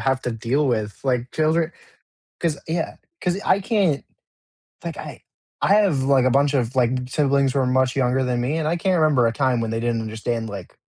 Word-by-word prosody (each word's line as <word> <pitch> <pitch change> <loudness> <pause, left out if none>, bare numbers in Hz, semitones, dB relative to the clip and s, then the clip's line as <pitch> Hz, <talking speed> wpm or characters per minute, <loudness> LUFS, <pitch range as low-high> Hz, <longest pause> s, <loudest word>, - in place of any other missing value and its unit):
have 135 -1 +1
to 125 - -2
deal 120 +6 0
with, 110 -5 -1
like, 125 -2 0
children 160 +2 +1 0.7
'cause, 165 -4 0
yeah 165 +1 -2 0.3
'cause 180 +2 0
I 200 - +3
can't 195 - +1 0.8
like - - -4
I - - -8 0.4
I 200 - +4
have, 190 -11 +3
like, 135 -2 +4
a 130 - +3
bunch 140 +2 +2
of, 125 -2 0
like, 125 -3 +3 0.2
siblings 140 -1 +2
who 140 - 0
are 130 - +2
much 130 0 +2
younger 130 0 +1
than 125 -1 -1
me, 135 +6 -1
and 160 - -1
I 165 +3 +1
can't 185 +1 +1
remember 150 -6 +4
a 115 - +1
time 130 -1 +1
when 115 -1 -2
they 115 - -2
didn't 115 0 -1
understand, 110 +1 -3
like, 100 -4 -8
130 Hz, 210 wpm, -22 LUFS, 120-155 Hz, 0.8 s, I